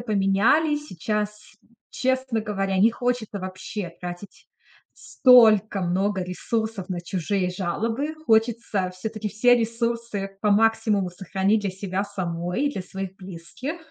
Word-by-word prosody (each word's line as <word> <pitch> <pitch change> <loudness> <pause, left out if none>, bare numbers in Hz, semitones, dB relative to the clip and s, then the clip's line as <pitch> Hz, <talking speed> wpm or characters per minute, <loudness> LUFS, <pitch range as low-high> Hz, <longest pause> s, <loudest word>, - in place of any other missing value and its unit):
поменялись. 235 +9 +2
Сейчас, 210 +3 -4 0.4
честно 260 -3 0
говоря, 195 -3 -1
не 220 +4 +6
хочется 245 -4 -2
вообще 185 0 -6
тратить 175 +2 -9 0.4
столько 220 -6 +5
много 190 +2 0
ресурсов 220 +1 -3
на 180 -2 -3
чужие 180 +2 -1
жалобы. 225 - -2
Хочется 220 -4 +1
всё-таки 215 +3 -5
все 245 +4 +4
ресурсы 230 -3 -2
по 210 - +2
максимуму 215 -2 +2
сохранить 190 +3 0
для 200 -2 -2
себя 190 0 -3
самой 180 +1 -3
и 285 - 0
для 190 - -4
своих 190 +1 -6
близких. 190 - -7
205 Hz, 120 wpm, -24 LUFS, 190-230 Hz, 0.4 s, не